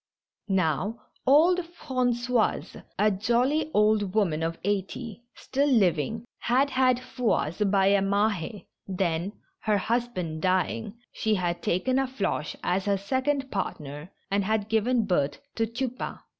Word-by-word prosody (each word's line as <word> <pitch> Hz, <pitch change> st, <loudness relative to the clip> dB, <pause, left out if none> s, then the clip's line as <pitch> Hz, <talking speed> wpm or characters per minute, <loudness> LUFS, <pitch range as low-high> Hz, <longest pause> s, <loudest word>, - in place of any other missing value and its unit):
Now, 190 Hz, +3 st, 0 dB, 0.3 s
old 325 Hz, +7 st, +6 dB
Frangoise, 250 Hz, -8 st, -1 dB
a 210 Hz, +1 st, +4 dB
jolly 240 Hz, +10 st, +1 dB
old 210 Hz, -3 st, +2 dB
woman 170 Hz, -8 st, +2 dB
of 165 Hz, 0 st, -2 dB
eighty, 205 Hz, +4 st, -3 dB
still 280 Hz, +2 st, 0 dB
living, 210 Hz, -, +2 dB
had 270 Hz, +4 st, +2 dB
had 255 Hz, -1 st, +3 dB
Fouasse 245 Hz, -8 st, -1 dB
by 195 Hz, -1 st, +3 dB
a 200 Hz, 0 st, +4 dB
Mahd, 200 Hz, -1 st, 0 dB, 0.2 s
then, 180 Hz, 0 st, -1 dB, 0.3 s
her 210 Hz, -2 st, +1 dB
husband 200 Hz, -8 st, -2 dB
dying, 190 Hz, +4 st, 0 dB, 0.2 s
she 220 Hz, -1 st, +1 dB
had 175 Hz, -2 st, -1 dB
taken 255 Hz, +12 st, +1 dB
a 270 Hz, -, +1 dB
Floche 205 Hz, -, -2 dB
as 185 Hz, +2 st, 0 dB
her 200 Hz, -1 st, +2 dB
second 265 Hz, +6 st, -1 dB
partner, 150 Hz, -5 st, -4 dB, 0.2 s
and 200 Hz, 0 st, +2 dB
had 215 Hz, +1 st, 0 dB
given 225 Hz, +1 st, +2 dB
birth 145 Hz, -7 st, +1 dB, 0.2 s
to 225 Hz, 0 st, 0 dB
Tupain. 255 Hz, +2 st, -4 dB
210 Hz, 130 wpm, -27 LUFS, 185-250 Hz, 0.3 s, old